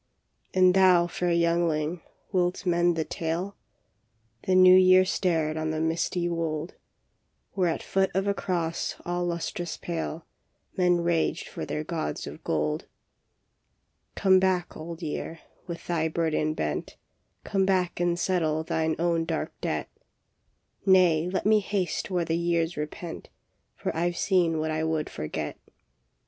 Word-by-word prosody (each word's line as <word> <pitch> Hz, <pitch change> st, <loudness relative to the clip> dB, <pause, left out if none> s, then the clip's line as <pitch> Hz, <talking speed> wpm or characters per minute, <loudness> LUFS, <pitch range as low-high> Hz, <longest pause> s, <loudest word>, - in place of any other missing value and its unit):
And 185 Hz, -1 st, +6 dB
thou, 185 Hz, -2 st, +5 dB
fair 175 Hz, 0 st, -1 dB
youngling, 170 Hz, -1 st, +1 dB, 0.3 s
wilt 180 Hz, -1 st, 0 dB
mend 175 Hz, -1 st, +3 dB
the 160 Hz, -1 st, -1 dB
tale? 170 Hz, +5 st, -3 dB, 0.4 s
" 110 Hz, 0 st, -30 dB
The 185 Hz, -, +3 dB
New 185 Hz, 0 st, +8 dB
Year 185 Hz, 0 st, +6 dB
stared 160 Hz, -5 st, 0 dB
on 155 Hz, 0 st, -1 dB
the 155 Hz, 0 st, -2 dB
misty 170 Hz, +2 st, 0 dB
wold, 165 Hz, -1 st, -2 dB, 0.8 s
Where 185 Hz, -3 st, +1 dB
at 165 Hz, -, -3 dB
foot 190 Hz, 0 st, +1 dB
of 195 Hz, +1 st, +1 dB
a 200 Hz, -, +2 dB
cross 170 Hz, -4 st, -2 dB
all 175 Hz, 0 st, -1 dB
lustrous 175 Hz, 0 st, -3 dB
pale 165 Hz, -1 st, -4 dB, 0.5 s
Men 180 Hz, -2 st, +3 dB
raged 170 Hz, -1 st, 0 dB
for -, -, -6 dB
their 150 Hz, -, -3 dB
gods 160 Hz, 0 st, -3 dB
of -, -, -9 dB
gold. 75 Hz, -1 st, -1 dB, 0.6 s
" -, -, -48 dB
Come 190 Hz, -1 st, +5 dB
back, 185 Hz, -2 st, 0 dB
Old 165 Hz, +2 st, -7 dB
Year, 160 Hz, +1 st, -4 dB, 0.3 s
with 170 Hz, -1 st, -7 dB
thy 165 Hz, -2 st, 0 dB
burden 155 Hz, -1 st, 0 dB
bent. -, -, -3 dB, 0.5 s
Come 195 Hz, -2 st, 0 dB
back 185 Hz, -3 st, +1 dB
and 175 Hz, -1 st, +1 dB
settle 160 Hz, -4 st, 0 dB
thine 160 Hz, 0 st, 0 dB
own 170 Hz, -1 st, +1 dB
dark -, -, -3 dB
debt." -, -, -2 dB, 0.6 s
" -, -, -47 dB
Nay, 180 Hz, -4 st, +4 dB
let 190 Hz, -, -2 dB
me 215 Hz, 0 st, +5 dB
haste 195 Hz, -2 st, -2 dB
where 180 Hz, -3 st, 0 dB
the 165 Hz, -, 0 dB
years 170 Hz, 0 st, 0 dB
repent, 160 Hz, +3 st, -6 dB, 0.5 s
For -, -, -4 dB
I 170 Hz, +2 st, +1 dB
ve 175 Hz, -, -7 dB
seen 175 Hz, -5 st, +2 dB
what 155 Hz, 0 st, -1 dB
I 155 Hz, 0 st, -1 dB
would 160 Hz, -1 st, -1 dB
forget." 75 Hz, 0 st, -5 dB
170 Hz, 155 wpm, -27 LUFS, 160-180 Hz, 0.8 s, New